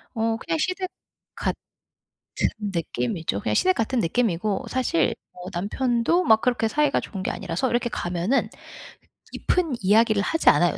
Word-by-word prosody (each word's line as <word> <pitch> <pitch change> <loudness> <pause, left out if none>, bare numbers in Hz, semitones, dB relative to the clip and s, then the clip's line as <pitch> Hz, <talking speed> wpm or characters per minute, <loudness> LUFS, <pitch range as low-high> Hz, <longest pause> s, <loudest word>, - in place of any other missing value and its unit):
어 225 0 0
그냥 325 +5 -2
시댁 365 +2 -1 0.5
같은 - - -2 1.0
느낌이죠. 165 - -2
그냥 105 - -1
시댁 185 +11 +3
같은 235 +2 0
느낌이고 200 0 0
사실 250 -11 +1 0.2
뭐 180 - -11
남편도 240 - +1
막 220 -1 +5
그렇게 235 -2 +1
사이가 295 +4 +2
좋은 195 - -6
게 - - -1
아니라서 260 - -2
이렇게 240 0 0
가면은 180 +5 0 0.8
깊은 335 -7 0
이야기를 215 +2 +4
하지 325 +7 +3
않아요 175 -2 +3
225 Hz, 325 characters per minute, -24 LUFS, 180-260 Hz, 1.0 s, 막